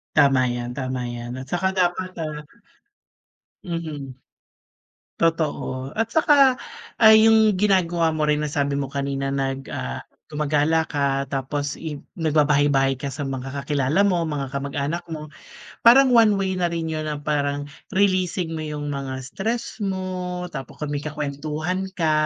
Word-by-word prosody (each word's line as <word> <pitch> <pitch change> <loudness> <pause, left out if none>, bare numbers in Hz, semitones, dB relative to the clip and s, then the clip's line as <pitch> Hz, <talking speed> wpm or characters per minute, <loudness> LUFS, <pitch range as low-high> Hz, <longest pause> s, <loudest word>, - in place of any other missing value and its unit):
Tama 135 -2 +5
yan, 120 0 -4
tama 130 -1 -3
yan. 120 +1 -6
At 130 - -6
saka 190 +2 +1
dapat, 185 0 0
ah 155 -2 -4 1.2
mhm. 155 -6 -5 1.1
Totoo, 150 -5 -1
at 225 - +2
saka 285 -4 +5 0.5
ay 220 0 +8
yung 220 -3 +5
ginagawa 175 -5 +2
mo 155 - -1
rin 150 0 +2
na 150 - -1
sabi 140 -1 -1
mo 140 - -1
kanina 135 0 -2
nag 135 0 -2
ah, 65 0 -4 0.3
gumagala 150 +1 +1
ka, 140 -2 0
tapos 140 +1 -3
i 155 -3 -6 0.2
nagbabahay-bahay 145 -4 +3
ka 140 +2 -5
sa 140 +1 -4
mga 135 0 -4
kakilala 140 +6 +1
mo, 175 -3 +2
mga 150 -4 -2
kamag-anak 140 +4 -2
mo. 155 -1 -5 0.5
Parang 255 +2 +7
one 225 -4 +6
way 195 -1 0
na 180 -2 0
rin 170 -1 -3
yun 155 0 -3
ng 145 -1 -5
parang 145 -1 0 0.3
releasing 185 -3 +1
mo 160 - -4
yung 150 -1 -4
mga 135 -1 -4
stress 220 - -4
mo. 185 -2 -3
Tapo 135 -3 -7
kami 145 -1 -3
kakuwentuhan 155 +5 -3
ka, 160 -2 +2
150 Hz, 145 wpm, -23 LUFS, 140-180 Hz, 1.2 s, ay